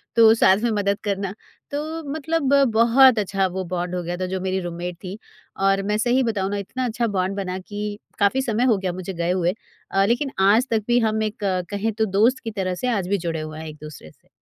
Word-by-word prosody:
तो 225 -1 +7
साथ 190 - +6
में 240 - +2
मदद 200 -1 0
करना। 200 -2 -2 0.4
तो 310 +3 -4
मतलब 315 -2 0 0.2
बहुत 235 +2 +6
अच्छा 195 -1 0
वो 190 - -2
बॉन्ड 180 0 -2
हो 180 - -2
गया 175 +1 -4
था, 185 - -2
जो 185 0 -3
मेरी 190 0 -1
रूममेट 175 0 -5
थीं। 185 +1 -5 0.5
और 195 0 +3
मैं 210 +1 0
सही 245 +3 +2
बताऊँ 200 -4 -1
ना, 205 - -1
इतना 250 +6 -4
अच्छा 235 0 -1
बॉन्ड 185 +2 0
बना 185 -2 -3
कि 205 +2 -6 0.2
काफ़ी 205 +6 +3
समय 235 -1 0
हो - - 0
गया 190 -2 -2
मुझे 185 +1 -6
गए 170 0 -1
हुए 180 -1 +1 0.4
अ, 195 0 +3
लेकिन 250 +5 0
आज 210 +7 +4
तक 220 -2 +1
भी 240 0 +4
हम 220 0 -1
एक 215 0 -3 0.3
कहें 205 +2 -1
तो 220 +1 +1
दोस्त 245 +5 +4
की 225 - -4
तरह 190 -3 -2
से 250 +8 -3
आज 200 -7 -1
भी 200 - +2
जुड़े 165 -2 -2
हुए 155 0 -7
हैं 160 - -7
एक-दूसरे 150 - -10
से। - - -32
200 Hz, 230 wpm, -22 LUFS, 185-230 Hz, 0.5 s, तो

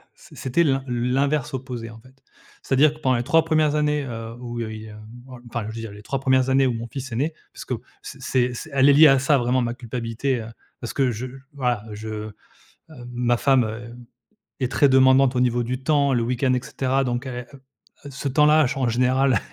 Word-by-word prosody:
c - - -17
c'était 135 +6 +1
l'in 135 -3 +1
l'inverse 135 +4 0
opposé, 125 -3 -5
en 110 0 -12
fait. 130 +3 -19 0.5
C'est-à-dire 145 +3 +3
que 155 - -16
pendant 130 -4 +2
les 120 - -2
3 165 +5 +3
1res 155 -2 +2
années, 150 -1 +1
heu, 115 -2 -7
où 120 -1 -6
heu, 110 -1 -4
il, 110 0 -8
hem 105 0 -12 0.5
enfin 115 -1 -3
je - - -6
veux 115 - -5
dire 115 - -7
les 105 +1 -12
3 135 - -3
1res 130 -1 +2
années 135 0 +4
où 125 - 0
mon 115 +1 -5
fils 130 +1 -7
est 115 - -4
né, 150 +6 -1 0.2
parce - - -9
qu'au - - -4 0.2
c - - -10
c'est 125 -1 0
c 160 +6 -7
elle 135 0 +5
est 140 - +7
liée 155 +2 +8
à 135 -2 +5
ça, 140 +2 +3
vraiment, 125 +1 +1
ma 120 -1 -1
culpabilité, 120 +1 -3
heu, 110 - -8 0.3
parce 120 - -5
que 135 -3 +1
je 115 +2 -5
l 135 +1 -12
voilà, 125 -6 -1
je 110 0 -6 0.6
hem, 130 -6 -12
ma 120 0 +1
femme, 135 -2 +3
heu, 115 +2 -7 0.6
est 130 0 -1
très 145 - +4
demandante 130 0 +5
au - - +2
niveau 120 -1 +1
du 125 +2 -4
temps, 140 -1 +2
le 120 -2 +1
week-end, 125 +2 0
et 125 - 0
cetera, 135 -1 -1
donc 125 +1 -2
elle 125 -1 -5
et - - -13
heu 135 - -15 0.5
heu, 140 - -8
ce 135 +1 -5
temps-là, 150 +2 +4
ch 130 - -4
en 130 -2 0
général, 125 0 +2
130 Hz, 235 wpm, -23 LUFS, 120-135 Hz, 0.6 s, liée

